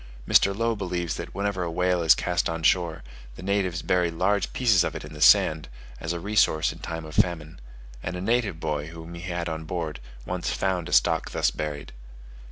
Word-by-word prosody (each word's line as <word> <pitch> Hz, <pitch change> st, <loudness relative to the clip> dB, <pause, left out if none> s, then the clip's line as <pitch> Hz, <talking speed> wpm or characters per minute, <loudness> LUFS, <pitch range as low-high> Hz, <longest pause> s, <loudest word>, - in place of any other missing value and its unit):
Mr. 100 Hz, 0 st, +4 dB
Low 115 Hz, 0 st, +1 dB
believes 90 Hz, -4 st, -3 dB
that -, -, -7 dB
whenever 100 Hz, -1 st, -1 dB
a 85 Hz, -, -2 dB
whale 90 Hz, +1 st, +1 dB
is 80 Hz, -1 st, +6 dB
cast 90 Hz, -1 st, 0 dB
on 80 Hz, 0 st, -4 dB
shore, 85 Hz, -1 st, +2 dB, 0.3 s
the -, -, -10 dB
natives 95 Hz, -3 st, -1 dB
bury 90 Hz, -2 st, +2 dB
large 95 Hz, +5 st, 0 dB
pieces 115 Hz, -8 st, +3 dB
of -, -, -3 dB
it -, -, -6 dB
in -, -, -11 dB
the 75 Hz, -, -10 dB
sand, 75 Hz, -3 st, +5 dB, 0.3 s
as 85 Hz, -, -3 dB
a 85 Hz, -, -3 dB
resource 95 Hz, -5 st, +2 dB
in -, -, -14 dB
time 80 Hz, -1 st, -5 dB
of 75 Hz, -, -10 dB
famine; 80 Hz, -6 st, 0 dB, 0.4 s
and 90 Hz, -, -4 dB
a 90 Hz, -, -5 dB
native 105 Hz, -4 st, 0 dB
boy, 75 Hz, -2 st, -2 dB
whom 80 Hz, +1 st, -10 dB
he 85 Hz, -, -8 dB
had 85 Hz, -1 st, -3 dB
on 80 Hz, -1 st, -4 dB
board, 80 Hz, -4 st, -4 dB, 0.3 s
once -, -, -3 dB
found 95 Hz, -3 st, -1 dB
a -, -, -8 dB
stock -, -, +3 dB
thus -, -, +1 dB
buried. 75 Hz, -2 st, -5 dB
85 Hz, 205 wpm, -26 LUFS, 80-95 Hz, 0.4 s, is